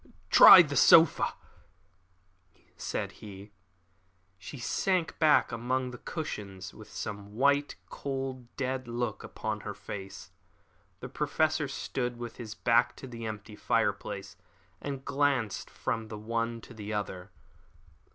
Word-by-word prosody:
"Try 180 - +11
this 145 -4 +1
sofa," 165 -2 +6 1.4
said - - -4
he. 100 0 -10 0.9
She 140 - -9
sank 175 +7 -1
back 155 -2 +4
among 125 +2 -2
the 125 - -10
cushions 100 - -6
with 110 - -13
the - - -15
same 105 -1 -6
white, 140 +3 +2
cold, 135 -3 -5
dead 130 -1 -2
look 120 +1 -3
upon 110 -1 -4
her 105 -1 -6
face. 95 -1 -8 0.7
The 125 - -6
Professor 150 +2 0
stood 125 -2 -3
with 120 -1 -7
his 110 -3 -7
back 120 +1 +2
to - - -10
the 115 -3 -7
empty 105 -1 -7
fireplace - - -1 0.5
and 140 -2 -5
glanced 140 -6 0
from 115 -1 -3
the 110 -1 -7
one 115 +2 -2
to 120 - -13
the 105 -1 -7
other. 95 -3 -4
120 Hz, 130 wpm, -29 LUFS, 110-135 Hz, 1.4 s, Try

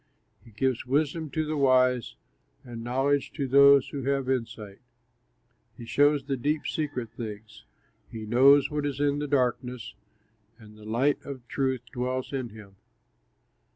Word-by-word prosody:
He - - -17
gives 125 +3 -2
wisdom 150 +3 0
to 155 +2 -2
the 155 +1 -3
wise, 130 -3 +2 0.5
And 120 -2 -8
knowledge 135 +3 0
to 140 -4 -3
those 140 +1 +6
who 140 - -5
have 135 -1 0
insight. 110 -5 -4 1.0
He 120 - -9
shows 145 +3 +2
the 140 0 -2
deep, 150 +5 -1
secret 140 -7 -3
things; 110 -2 -9 0.5
He 110 -1 -7
knows 135 +6 +5
what 150 0 -2
is 140 -1 -5
in 145 0 +1
the 150 - -3
darkness, 125 -3 -1 0.6
And 105 -2 -16
the 105 0 -14
light 125 +7 0
of 130 -4 -9
truth 130 -3 -1
dwells 130 +2 -3
in 130 -3 -3
him. 105 -3 -14
130 Hz, 150 wpm, -27 LUFS, 115-140 Hz, 1.0 s, those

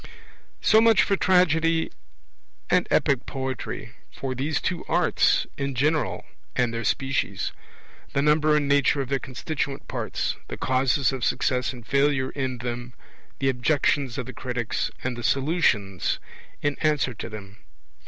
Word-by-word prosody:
So 220 - +6
much 225 -3 +6
for 200 - +2
Tragedy 165 -3 +3 0.8
and - - +3
Epic 135 -3 +2
poetry 130 -3 -4 0.2
for 135 -1 -4
these 145 +4 -1
two 180 -2 -2
arts 175 0 +3
in 140 -1 -2
general 150 +4 0 0.3
and 120 -2 +1
their 115 0 -3
species; 135 -5 -1 0.6
the 140 - +2
number 150 0 +4
and 150 -1 +1
nature 140 0 +3
of 130 - -5
their 135 -1 +1
constituent 135 +1 -4
parts; - - -2
the - - -6
causes 130 +1 +2
of 130 -2 -4
success 125 +2 +1
and 120 -3 -11
failure 140 -1 +2
in 130 -3 -3
them; 120 +1 -5 0.4
the 135 - +1
Objections 135 0 +1
of - - -3
the 125 - -8
critics, 120 -2 -2
and 130 -1 -2
the 120 - -7
Solutions 120 - +1 0.5
in 145 -1 0
answer 150 -5 +2
to 115 - -7
them. 105 -1 -9
135 Hz, 145 wpm, -25 LUFS, 125-150 Hz, 0.8 s, So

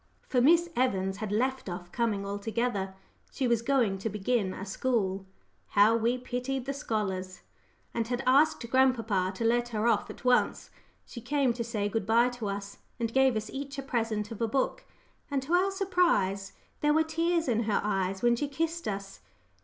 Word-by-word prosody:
For 250 - +2
Miss 340 +6 +5
Evans 195 -6 0
had 210 -1 -4
left 255 +1 0
off 175 0 -7
coming 215 -4 -1
altogether. 200 -1 -2 0.4
She 265 - -1
was 235 -2 +2
going 230 -6 +1
to 225 - -2
begin 210 0 0
a 195 - -6
school 195 -3 -1 0.5
how 210 +3 +7
we 230 +2 +1
pitied 250 +1 -3
the 275 - -2
scholars! 190 -8 -3 0.5
and 230 -1 -1
had 245 +1 -2
asked 265 -1 +3
grandpapa 230 -8 +2
to 230 - -3
let 240 +1 +2
her 215 -1 -1
off 225 -3 +2
at - - -10
once. 250 0 +2 0.3
She 235 - -9
came 270 0 +1
to 235 0 -3
say 220 -3 -2
good 205 -1 -2
bye 235 +2 +4
to 245 -3 -5
us, 200 0 -6 0.2
and 230 -1 -2
gave 265 -2 +4
us 215 0 -3
each 280 +1 -6
a 275 - -4
present 225 -5 -2
of 225 - -7
a 230 - +2
book 275 - -1 0.4
and, 280 -2 0
to 310 +6 -3
our 370 +2 +4
surprise, 340 - +1 0.3
there 295 0 +3
were 320 - +4
tears 330 +1 0
in 230 -2 +1
her 210 - +1
eyes 195 -1 -1
when 240 0 +4
she 290 +5 -2
kissed 330 +4 -2
us! 195 -1 -5
235 Hz, 185 wpm, -29 LUFS, 205-265 Hz, 0.5 s, how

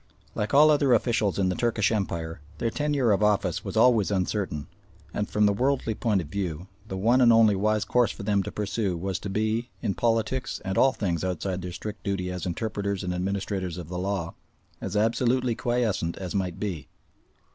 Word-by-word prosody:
Like 105 0 -2
all 150 +2 +7
other 145 -3 +4
officials 110 -4 +1
of 95 -2 +2
the - - +1
Turkish 115 -3 +1
Empire, 85 -7 -2 0.2
their 115 - -1
tenure 145 -5 +1
of 100 - +2
office 105 -1 +1
was - - -4
always 115 -6 +5
uncertain, 95 -6 -1 0.5
and, 105 - -2
from 105 0 +2
the 100 - +4
worldly 125 0 0
point 105 -4 +1
of 80 - -8
view, 90 -1 -4 0.2
the 95 - -4
one 120 +7 +3
and 120 -1 +7
only 110 -2 +5
wise 105 +2 +1
course 120 -2 +2
for - - -9
them 100 -1 +2
to - - -5
pursue 105 -3 -2
was 95 +2 -3
to 100 - -6
be, 110 +4 -1
in 100 - -1
politics 120 +1 0
and 95 0 -2
all 135 - +5
things 90 -9 -2
outside 95 +1 -2
their 90 0 -5
strict 105 +3 -7
duty 95 -2 -2
as 90 0 -4
interpreters 100 +1 -2
and 90 -1 -2
administrators 95 -1 -2
of 85 -3 -7
the 90 0 -4
law, 95 -3 -2 0.5
as 95 +2 -3
absolutely 120 +3 +2
quiescent 110 -8 -1
as 90 -2 -5
might 95 -4 -2
be. 90 -9 -4
100 Hz, 195 wpm, -26 LUFS, 95-115 Hz, 0.5 s, all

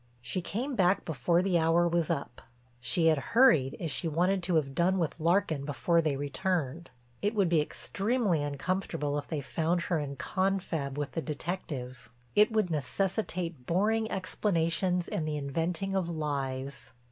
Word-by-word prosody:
She 125 +9 -3
came 245 - -3
back 190 -1 +3
before 170 +2 +1
the 185 -3 +2
hour 165 +2 +3
was 170 -2 +1
up. 140 -3 -3 0.4
She 165 +6 +1
had 160 -3 +4 0.2
hurried 195 - +5
as 165 -4 -3
she 165 - -1
wanted 180 +5 +1
to 175 0 0
have 140 -4 +1
done 180 +5 +2
with 165 -4 0
Larkin 165 -3 +2
before 160 +4 +1
they 155 -3 0
returned. 150 +2 -2 0.3
It 205 +2 0
would 200 -3 +3
be 165 -3 +4
extremely 200 - -1
uncomfortable 145 0 -2
if 140 - -9
they 155 -3 -3
found 165 +5 0
her 170 -1 0
in 140 -2 -4
confab 170 -4 -1
with 145 -2 -2
the 165 - -2
detective; 140 -7 -5 0.3
it 210 +2 +5
would 215 -5 +1
necessitate 170 - -2
boring 220 +5 +1
explanations 180 -1 0
and 155 - -2
the 150 -1 -1
inventing 165 +7 -2
of 185 -3 0
lies. 140 -4 -4
165 Hz, 160 wpm, -30 LUFS, 145-185 Hz, 0.4 s, hurried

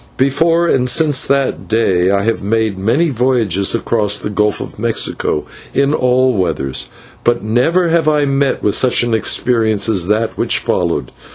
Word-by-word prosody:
Before 165 +6 +2
and 125 -5 +1
since 150 -1 +1
that 140 0 -1
day 95 -5 +1
I 100 0 +1
have 115 +1 -1
made 110 0 -1
many 120 - 0
voyages 115 -6 0
across 105 -3 0
the 105 - -5
Gulf 105 0 0
of - - -8
Mexico 110 -8 -1 0.3
in 140 +1 +2
all 130 -2 +2
weathers, 85 - -2 0.4
but 120 0 +1
never 160 +11 +1
have 165 -1 +1
I 150 -1 +2
met 140 0 0
with 105 - +1
such 125 -1 +2
an 120 -1 -1
experience 110 -1 +1
as 95 -6 0
that 110 +2 -1
which - - +1
followed. - - -2
115 Hz, 165 wpm, -15 LUFS, 105-135 Hz, 0.4 s, Before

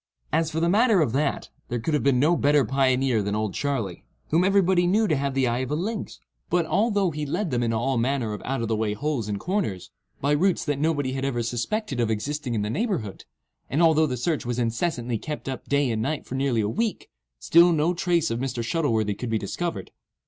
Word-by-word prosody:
As 160 0 +2
for 160 - -2
the 170 - +2
matter 215 +2 +4
of 150 -8 +2
that, 140 +5 -1 0.2
there 120 - -1
could 140 +8 -2
have 150 - +2
been 130 0 +3
no 155 +6 +4
better 145 -3 +3
pioneer 130 -2 +2
than 100 +1 -2
"Old 110 -2 -1
Charley," 125 -11 -2 0.3
whom 165 +3 +4
everybody 190 -2 +3
knew 215 +4 +3
to 155 - +2
have 140 -1 -2
the 135 -1 +2
eye 120 0 0
of 130 -1 -3
a 150 - 0
lynx; 205 +6 -4 0.3
but, 175 -1 +2
although 205 -1 +1
he 150 0 -4
led 170 +4 -2
them 120 -1 0
into 115 -1 0
all 130 +1 0
manner 120 -3 0
of 105 - -6
out 135 -3 -2
of - - -2
the 110 - 0
way 105 -1 -1
holes 140 -3 -2
and 100 -1 -3
corners, 175 - -2 0.3
by 140 - 0
routes 180 +5 +1
that 145 -2 -1
nobody 145 -4 0
had 135 0 -3
ever 125 -4 -1
suspected 125 - -2
of 115 -2 +1
existing 125 +3 -2
in 105 - 0
the 105 - -2
neighbourhood, 180 - -2 0.4
and 155 +5 +2
although 160 -1 +4
the 125 -2 -3
search 155 +5 -1
was 120 0 -3
incessantly 120 0 -1
kept 150 +3 -6
up 130 -1 -5
day 140 -3 +2
and 110 -1 -1
night 145 +6 -2
for - - -8
nearly 130 -4 +1
a 105 - 0
week, 225 - -2 0.3
still 170 - +5
no 160 +2 +2
trace 170 -3 +1
of 115 - -2
Mr. 130 -2 -2
Shuttleworthy 115 -7 0
could 120 +4 -5
be 110 - +1
discovered. 165 - -4
140 Hz, 230 wpm, -25 LUFS, 115-165 Hz, 0.4 s, still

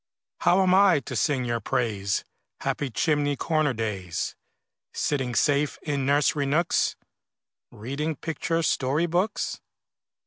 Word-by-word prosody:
How 190 +2 +4
am 185 -1 +3
I 190 -4 +6
to 130 +1 -7
sing 130 +3 +1
your 120 -1 -1
praise, 100 -5 -1 0.4
Happy 140 - -1
chimney 145 +5 +1
corner 155 -1 +1
days, 105 -7 -3 0.6
Sitting 130 -5 -1
safe 145 +1 +2
in 140 -3 -1
nursery 145 0 +2
nooks, 160 +5 +1 0.7
Reading 140 +8 -4
picture 165 +2 -2
story 145 +2 +1
books? 175 +5 -1
145 Hz, 115 wpm, -26 LUFS, 125-160 Hz, 0.7 s, I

